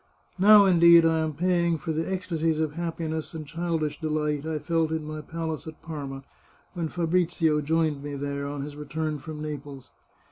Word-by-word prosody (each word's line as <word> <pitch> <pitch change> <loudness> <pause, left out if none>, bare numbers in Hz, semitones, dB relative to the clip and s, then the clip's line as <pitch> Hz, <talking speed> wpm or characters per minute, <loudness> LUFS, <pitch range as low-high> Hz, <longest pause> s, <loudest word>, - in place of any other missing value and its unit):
Now, 205 +1 +8
indeed, 170 -2 +7
I 160 0 +3
am 160 -1 -1
paying 170 0 +1
for 160 +1 -4
the 160 +4 -2
ecstasies 165 -4 -1
of 155 -2 -1
happiness 165 -1 -4
and 155 -1 -5
childish 160 -1 -2
delight 150 -1 -1
I 160 -1 -1
felt 165 0 0
in 160 -1 -3
my 155 0 -5
palace 160 0 -5
at 155 - -10
Parma, 140 -4 -6 0.5
when 170 -3 -2
Fabrizio 165 -2 +1
joined 155 -1 0
me 145 0 -5
there 140 0 -3
on 140 -1 -4
his 145 0 -7
return 150 +1 -3
from 150 +2 -7
Naples. 140 -3 -7
160 Hz, 175 wpm, -26 LUFS, 150-165 Hz, 0.5 s, Now